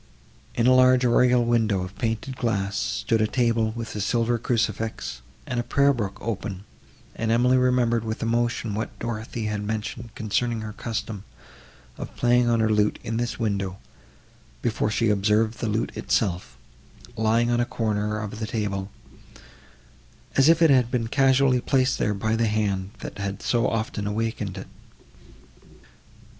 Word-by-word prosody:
In 115 Hz, -, +1 dB
a 130 Hz, -, +6 dB
large 130 Hz, 0 st, +5 dB
oriel 125 Hz, 0 st, +4 dB
window 110 Hz, -5 st, +1 dB
of 90 Hz, +2 st, -8 dB
painted 115 Hz, +3 st, -2 dB
glass, 100 Hz, -5 st, -1 dB
stood 115 Hz, +1 st, 0 dB
a 110 Hz, -, +3 dB
table, 115 Hz, -2 st, +1 dB
with 115 Hz, -2 st, -6 dB
a 105 Hz, -, -2 dB
silver 115 Hz, +3 st, +1 dB
crucifix, 110 Hz, -, -2 dB, 0.2 s
and 120 Hz, -2 st, -2 dB
a -, -, 0 dB
prayer 140 Hz, +2 st, +3 dB
book 105 Hz, -5 st, -3 dB
open; 100 Hz, -3 st, -4 dB, 0.5 s
and 115 Hz, -, -2 dB
Emily 125 Hz, +3 st, +4 dB
remembered 125 Hz, -3 st, +2 dB
with 110 Hz, 0 st, -4 dB
emotion 120 Hz, -1 st, 0 dB
what 110 Hz, +2 st, -4 dB
Dorothée 115 Hz, -1 st, -4 dB
had 105 Hz, -1 st, -2 dB
mentioned 110 Hz, +2 st, -4 dB
concerning 115 Hz, +2 st, -1 dB
her 110 Hz, -1 st, -6 dB
custom 110 Hz, -3 st, -4 dB, 0.8 s
of -, -, -7 dB
playing 120 Hz, 0 st, +3 dB
on 115 Hz, -1 st, +2 dB
her 110 Hz, -, +2 dB
lute 105 Hz, 0 st, +2 dB
in 115 Hz, +1 st, -3 dB
this 120 Hz, 0 st, -2 dB
window, 100 Hz, -4 st, -2 dB, 0.9 s
before 110 Hz, -2 st, 0 dB
she 115 Hz, +1 st, +1 dB
observed 105 Hz, +2 st, +2 dB
the 115 Hz, -, -1 dB
lute 110 Hz, +2 st, -1 dB
itself, 95 Hz, -4 st, -1 dB, 0.6 s
lying 115 Hz, +1 st, +2 dB
on 120 Hz, -, +2 dB
a -, -, +3 dB
corner 105 Hz, -2 st, -1 dB
of 105 Hz, 0 st, -6 dB
the 110 Hz, -, -3 dB
table, 100 Hz, -3 st, -2 dB, 1.5 s
as 135 Hz, +3 st, +5 dB
if 165 Hz, 0 st, +5 dB
it 160 Hz, -, +6 dB
had 125 Hz, -3 st, +4 dB
been 115 Hz, -3 st, -1 dB
carelessly 135 Hz, -1 st, +3 dB
placed 130 Hz, 0 st, +1 dB
there 105 Hz, -, +1 dB
by 110 Hz, +3 st, 0 dB
the 115 Hz, 0 st, +1 dB
hand, 100 Hz, -3 st, -1 dB
that -, -, -7 dB
had 100 Hz, 0 st, -4 dB
so 120 Hz, -1 st, +2 dB
often 110 Hz, -2 st, -2 dB
awakened 105 Hz, -2 st, -2 dB
it. 95 Hz, -, -7 dB
115 Hz, 160 wpm, -25 LUFS, 105-120 Hz, 1.5 s, a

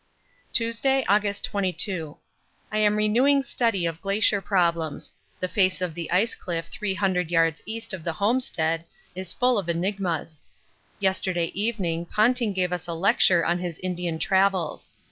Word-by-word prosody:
Tuesday, 250 Hz, +4 st, +1 dB
August 205 Hz, 0 st, +1 dB
22. 185 Hz, -5 st, -2 dB, 0.5 s
I 215 Hz, -, 0 dB
am 210 Hz, 0 st, +3 dB
renewing 250 Hz, +7 st, +3 dB
study 230 Hz, -9 st, 0 dB
of 165 Hz, 0 st, -3 dB
glacier 200 Hz, 0 st, +2 dB
problems; 170 Hz, -6 st, 0 dB, 0.3 s
the 185 Hz, -, -1 dB
face 185 Hz, -1 st, +2 dB
of 180 Hz, -3 st, -2 dB
the 170 Hz, 0 st, -5 dB
ice 200 Hz, +6 st, +2 dB
cliff 165 Hz, -2 st, -5 dB
300 190 Hz, -4 st, -1 dB
yards 165 Hz, -2 st, +2 dB
east 225 Hz, 0 st, -5 dB
of 180 Hz, -4 st, -6 dB
the 170 Hz, -, -2 dB
homestead 165 Hz, -6 st, 0 dB, 0.3 s
is 185 Hz, 0 st, -6 dB
full 250 Hz, -3 st, +2 dB
of 180 Hz, -4 st, -5 dB
enigmas. 170 Hz, -3 st, -2 dB, 0.6 s
Yesterday 185 Hz, -3 st, 0 dB
evening 185 Hz, -6 st, -1 dB
Ponting 235 Hz, +2 st, +2 dB
gave 180 Hz, -2 st, -1 dB
us 175 Hz, 0 st, -4 dB
a 170 Hz, -, -3 dB
lecture 175 Hz, -1 st, +4 dB
on 175 Hz, +1 st, +1 dB
his 175 Hz, -2 st, -4 dB
Indian 175 Hz, -2 st, -3 dB
travels. 190 Hz, -1 st, 0 dB
185 Hz, 145 wpm, -25 LUFS, 170-210 Hz, 0.6 s, lecture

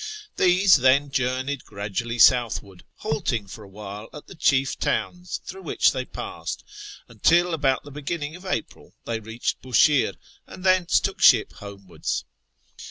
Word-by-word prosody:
These, 185 Hz, 0 st, +5 dB
then, 135 Hz, +2 st, +3 dB
journeyed 130 Hz, 0 st, -1 dB
gradually 105 Hz, +4 st, -4 dB
southwards, 115 Hz, -6 st, +3 dB
halting 120 Hz, -7 st, -2 dB
for 105 Hz, +3 st, -11 dB
a -, -, -13 dB
while 105 Hz, +2 st, -9 dB
at 150 Hz, -, -10 dB
the -, -, -12 dB
chief 140 Hz, -5 st, +1 dB
towns 180 Hz, 0 st, -2 dB
through 190 Hz, +1 st, -8 dB
which -, -, +2 dB
they -, -, -4 dB
passed, -, -, -6 dB, 0.4 s
until 175 Hz, +1 st, +2 dB
about 135 Hz, -4 st, +1 dB
the 145 Hz, -, -12 dB
beginning 150 Hz, +2 st, -4 dB
of 180 Hz, -, -12 dB
April 185 Hz, -, -5 dB
they 115 Hz, -1 st, -2 dB
reached 115 Hz, +2 st, -4 dB
Bushire, 130 Hz, +3 st, +3 dB, 0.3 s
and 185 Hz, -, -11 dB
thence 185 Hz, -2 st, +3 dB
took -, -, -4 dB
ship -, -, +5 dB
homewards. 100 Hz, -3 st, -6 dB
130 Hz, 145 wpm, -24 LUFS, 110-165 Hz, 0.4 s, These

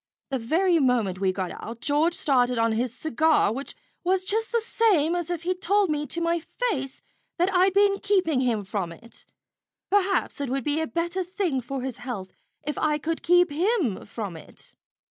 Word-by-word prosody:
The 265 Hz, -, 0 dB
very 335 Hz, +9 st, +2 dB
moment 235 Hz, -9 st, +1 dB
we 190 Hz, -1 st, +2 dB
got 185 Hz, -1 st, -3 dB
out, 230 Hz, +1 st, -7 dB
George 305 Hz, +5 st, +1 dB
started 250 Hz, -4 st, +2 dB
on 230 Hz, 0 st, +2 dB
his 235 Hz, +2 st, 0 dB
cigar, 315 Hz, -2 st, +2 dB
which 275 Hz, +4 st, -6 dB, 0.3 s
was 370 Hz, +1 st, +1 dB
just 440 Hz, +3 st, 0 dB
the 470 Hz, -, +2 dB
same 405 Hz, -8 st, +2 dB
as 350 Hz, -1 st, -3 dB
if 345 Hz, -2 st, -3 dB
he'd 365 Hz, +1 st, -2 dB
told 395 Hz, -2 st, +2 dB
me 295 Hz, 0 st, -1 dB
to 335 Hz, -, -4 dB
my 335 Hz, 0 st, +1 dB
face 315 Hz, -, -3 dB, 0.3 s
that 360 Hz, +3 st, +1 dB
I'd 370 Hz, +1 st, +4 dB
been 400 Hz, 0 st, +4 dB
keeping 375 Hz, -9 st, +2 dB
him 230 Hz, -5 st, 0 dB
from 190 Hz, -3 st, -3 dB
it. 230 Hz, +7 st, -12 dB, 0.7 s
Perhaps 390 Hz, -6 st, +1 dB
it 280 Hz, -, -2 dB
would 270 Hz, 0 st, -1 dB
be 295 Hz, +4 st, 0 dB
a 320 Hz, -, -1 dB
better 345 Hz, +3 st, -2 dB
thing 355 Hz, -7 st, -1 dB
for 260 Hz, +2 st, -5 dB
his 260 Hz, -3 st, -4 dB
health 225 Hz, -7 st, -6 dB, 0.3 s
if 295 Hz, -, -3 dB
I 300 Hz, -1 st, +2 dB
could 320 Hz, +2 st, -3 dB
keep 355 Hz, -1 st, +4 dB
him 335 Hz, -, 0 dB
from 205 Hz, -4 st, -5 dB
it." 160 Hz, -, -13 dB
310 Hz, 190 wpm, -25 LUFS, 245-365 Hz, 0.7 s, I'd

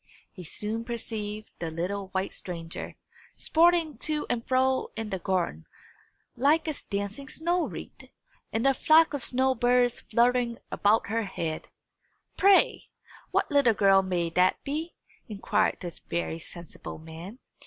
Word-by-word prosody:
He 180 Hz, -, -10 dB
soon 215 Hz, +7 st, -4 dB
perceived 215 Hz, -3 st, -5 dB
the 165 Hz, -, -3 dB
little 185 Hz, +5 st, -3 dB
white 190 Hz, 0 st, -2 dB
stranger, 165 Hz, -2 st, -6 dB, 0.4 s
sporting 330 Hz, -2 st, +3 dB
to 305 Hz, -1 st, -1 dB
and 235 Hz, -1 st, -1 dB
fro 260 Hz, 0 st, +2 dB
in 220 Hz, -1 st, -4 dB
the 190 Hz, -, -2 dB
garden, 175 Hz, -, -1 dB, 0.7 s
like 300 Hz, +6 st, +3 dB
a 310 Hz, -, 0 dB, 0.2 s
dancing 200 Hz, +7 st, -3 dB
snow 345 Hz, +2 st, 0 dB
wreath, -, -, -10 dB, 0.4 s
and 225 Hz, +3 st, -1 dB
the 270 Hz, -, +5 dB
flock 315 Hz, +4 st, +5 dB
of 280 Hz, -4 st, -3 dB
snow 260 Hz, +1 st, +2 dB
birds 245 Hz, 0 st, +2 dB
fluttering 240 Hz, +1 st, +2 dB
about 210 Hz, +1 st, +2 dB
her 225 Hz, 0 st, 0 dB
head. 165 Hz, -5 st, -4 dB, 0.7 s
"Pray, 395 Hz, 0 st, +4 dB, 0.4 s
what -, -, 0 dB
little 280 Hz, -6 st, +4 dB
girl 195 Hz, -1 st, +5 dB
may 175 Hz, -3 st, -1 dB
that 180 Hz, +2 st, +2 dB
be?" 310 Hz, +4 st, -4 dB, 0.3 s
inquired 205 Hz, -2 st, +1 dB
this 175 Hz, -3 st, -6 dB
very 165 Hz, -1 st, -3 dB
sensible 170 Hz, 0 st, -9 dB
man. 165 Hz, +7 st, -10 dB
225 Hz, 140 wpm, -28 LUFS, 185-265 Hz, 0.7 s, the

